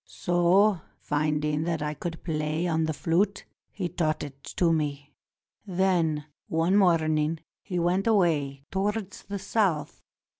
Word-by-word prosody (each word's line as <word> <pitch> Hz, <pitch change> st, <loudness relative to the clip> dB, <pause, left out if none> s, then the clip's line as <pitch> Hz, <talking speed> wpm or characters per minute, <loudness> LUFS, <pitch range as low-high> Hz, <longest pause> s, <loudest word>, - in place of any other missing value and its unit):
So, 175 Hz, +2 st, +3 dB, 0.2 s
finding 150 Hz, 0 st, 0 dB
that 165 Hz, -3 st, -1 dB
I 150 Hz, 0 st, -2 dB
could 165 Hz, +2 st, -6 dB
play 155 Hz, 0 st, -1 dB
on 160 Hz, -1 st, +1 dB
the 155 Hz, -, -1 dB
flute, 185 Hz, +7 st, 0 dB, 0.3 s
he 190 Hz, -4 st, -3 dB
taught 160 Hz, -2 st, -1 dB
it 140 Hz, -1 st, -9 dB
to 170 Hz, -2 st, +3 dB
me. 145 Hz, -2 st, -2 dB, 0.5 s
Then 175 Hz, -5 st, +1 dB, 0.2 s
one 165 Hz, +4 st, +1 dB
morning 160 Hz, -4 st, +3 dB, 0.2 s
he 180 Hz, -3 st, -4 dB
went 180 Hz, +4 st, +1 dB
away 155 Hz, -10 st, +2 dB
towards 200 Hz, +1 st, -2 dB
the 200 Hz, -, -5 dB
South. 185 Hz, -8 st, 0 dB
165 Hz, 135 wpm, -27 LUFS, 150-185 Hz, 0.5 s, So